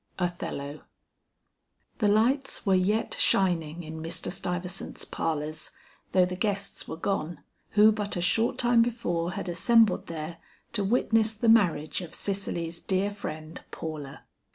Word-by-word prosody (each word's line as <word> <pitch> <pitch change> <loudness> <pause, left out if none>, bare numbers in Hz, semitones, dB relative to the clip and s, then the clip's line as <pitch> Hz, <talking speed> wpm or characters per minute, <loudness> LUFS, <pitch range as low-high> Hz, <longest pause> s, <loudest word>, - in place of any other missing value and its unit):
OTHELLO. 155 -5 -3 1.2
The 210 - +3
lights 240 +7 +2
were 195 - +4
yet 195 +4 +2
shining 170 -3 +1
in 160 0 -7
Mr. 165 +2 -3
Stuyvesant's 180 0 -4
parlors, 155 0 -3 0.4
though 185 -1 +5
the 180 0 -4
guests 200 0 -2
were 160 - -5
gone, 170 -3 -2 0.3
who 215 +1 +7
but 210 -1 -2
a - - -1
short 230 +8 +2
time 240 -2 +4
before 180 -8 -1
had - - -4
assembled 225 +4 +3
there 165 0 -5 0.4
to 205 -3 +1
witness 225 +1 +2
the 225 +2 +1
marriage 180 -8 +3
of 175 - -6
Cicely's 170 -4 -3
dear 195 +3 0
friend, 160 -6 -7
Paula. 150 -4 -7
185 Hz, 135 wpm, -28 LUFS, 165-215 Hz, 1.2 s, who